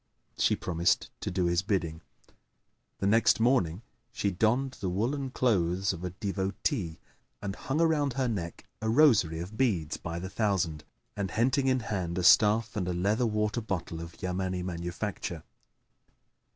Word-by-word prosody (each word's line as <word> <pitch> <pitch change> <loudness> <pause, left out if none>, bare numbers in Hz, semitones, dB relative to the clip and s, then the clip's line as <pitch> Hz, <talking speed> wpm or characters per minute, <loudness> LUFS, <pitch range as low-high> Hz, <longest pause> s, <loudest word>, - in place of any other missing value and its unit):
She - - +2
promised 85 0 0
to - - -3
do 90 - 0
his 85 0 +2
bidding; 90 -6 -1 1.0
the - - -2
next 115 +3 +4
morning 110 -6 +2 0.3
she 105 -4 -1
donned 120 +8 +1
the 95 - -1
woollen 130 +9 -1
clothes 95 -7 +1
of 85 0 -8
a 90 - -2
devotee 95 - -2 0.4
and 100 -1 -4
hung 135 +7 -2
around 155 -5 +2
her 130 0 0
neck 85 -8 -4 0.2
a 110 - -1
rosary 110 - +4
of 95 +6 -7
beads 90 - +1
by 85 0 -5
the 90 +2 -4
thousand; 95 -7 -1 0.3
and, 100 -2 -2
henting 130 +6 +1
in 130 -1 +2
hand 95 -6 -3
a 90 - 0
staff 105 +4 +5
and 95 -4 -1
a 90 - -1
leather 105 +7 +1
water 105 +2 0
bottle 90 -6 -4
of 85 0 -9
Yamani 90 0 -2
manufacture. 90 -1 -4
100 Hz, 155 wpm, -29 LUFS, 85-115 Hz, 1.0 s, staff